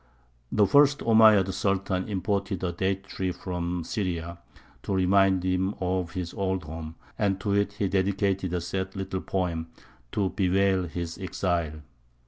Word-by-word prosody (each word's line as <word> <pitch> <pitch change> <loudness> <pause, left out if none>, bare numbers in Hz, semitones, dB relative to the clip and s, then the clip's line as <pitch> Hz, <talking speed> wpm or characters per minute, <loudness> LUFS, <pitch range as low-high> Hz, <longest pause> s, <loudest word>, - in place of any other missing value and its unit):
The 105 - +4
first 145 +6 +5
Omeyyad 110 -4 +6
Sultan 95 0 -1
imported 100 -1 -1
a 90 - 0
date 95 +2 -1
tree 95 -2 -3
from 90 -1 -3
Syria, 85 -4 -3 0.4
to 100 - -2
remind 95 0 +3
him 95 +2 0
of 90 -2 -1
his 90 -2 -4
old 95 -2 -1
home; 80 +1 -7 0.2
and 100 -2 +1
to 100 -1 0
it 100 0 +1
he 100 0 -1
dedicated 95 -1 0
a 90 -1 -1
sad 95 +2 -4
little 95 -1 -3
poem 85 -4 -2 0.5
to 100 -3 0
bewail 95 -1 +2
his 85 +1 -5
exile. 85 -5 -2
95 Hz, 145 wpm, -27 LUFS, 90-100 Hz, 0.5 s, Omeyyad